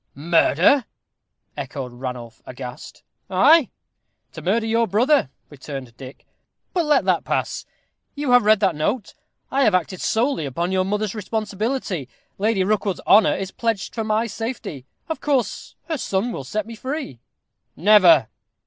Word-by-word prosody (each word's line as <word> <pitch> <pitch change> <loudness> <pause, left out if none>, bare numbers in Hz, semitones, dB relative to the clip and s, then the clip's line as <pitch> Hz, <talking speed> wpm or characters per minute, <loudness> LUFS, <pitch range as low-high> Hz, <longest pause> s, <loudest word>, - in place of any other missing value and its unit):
"Murder!" 170 - +3 0.7
echoed 135 -2 -6
Ranulph, 120 -2 -7
aghast. 125 +2 -9 0.3
"Ay, 270 - +5 0.6
to - - -9
murder 220 +5 +1
your 230 +1 +1
brother," 235 - +2 0.2
returned 135 -4 -8
Dick; 130 +1 -12 0.5
"but 345 -3 +1
let 300 -1 +3
that - - +2
pass. - - -2 0.5
You 290 -3 -1
have 245 0 +7
read 215 0 +4
that 190 -4 +3
note. 200 +9 -2 0.4
I 275 +1 +2
have 210 -6 +4
acted 185 +1 -2
solely 225 - 0
upon 170 +7 -2
your 185 0 +1
mother's 210 +1 -1
responsibility. 215 - -3 0.3
Lady 205 -1 +2
Rookwood's 200 -1 -1
honor 210 +1 +5
is 195 0 -4
pledged 225 -3 -2
for 225 - -2
my 215 +1 +1
safety. 220 - -6 0.2
Of 320 - -4
course 275 -5 -1
her 320 -4 -2
son 200 +4 -1
will 140 - -6
set 215 +10 -3
me 230 - -9
free." 260 - -5 0.6
"Never!" 175 - +6
205 Hz, 145 wpm, -22 LUFS, 155-230 Hz, 0.7 s, have